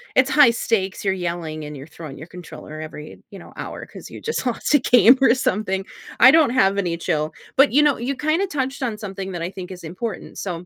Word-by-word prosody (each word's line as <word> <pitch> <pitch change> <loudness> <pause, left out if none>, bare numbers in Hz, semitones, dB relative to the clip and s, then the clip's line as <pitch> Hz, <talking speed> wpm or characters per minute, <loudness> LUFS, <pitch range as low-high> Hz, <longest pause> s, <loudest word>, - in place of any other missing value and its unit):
it's 260 +2 +4
high 290 -5 +7
stakes, 205 -5 -1
you're 190 - +2
yelling 170 -4 -4
and 150 0 -8
you're 135 - -9
throwing 155 -3 -10
your 155 - -9
controller 165 -3 -10
every, 155 -1 -9
you 200 - -11
know, - - -14
hour - - -7
'cause - - -12
you - - -10
just 460 - -3
lost 245 +3 -1
a 290 - +6
game 245 0 +6
or 250 -3 +5
something, 195 -6 -1 0.3
I 260 - +9
don't 315 -3 +5
have 200 -6 +2
any 175 -4 -1
chill. 155 -2 -2 0.2
But 275 +2 +5
you 285 +5 +5
know, 295 -3 +3
you 255 +4 -3
kinda 310 +8 0
touched 275 -5 -3
on 230 -4 -2
something 195 -2 -6
that 175 - -5
I 170 - -2
think 185 -2 -8
is 180 -1 -10
important, 190 +7 -6
so, 180 -2 -5
195 Hz, 230 wpm, -21 LUFS, 170-260 Hz, 0.3 s, I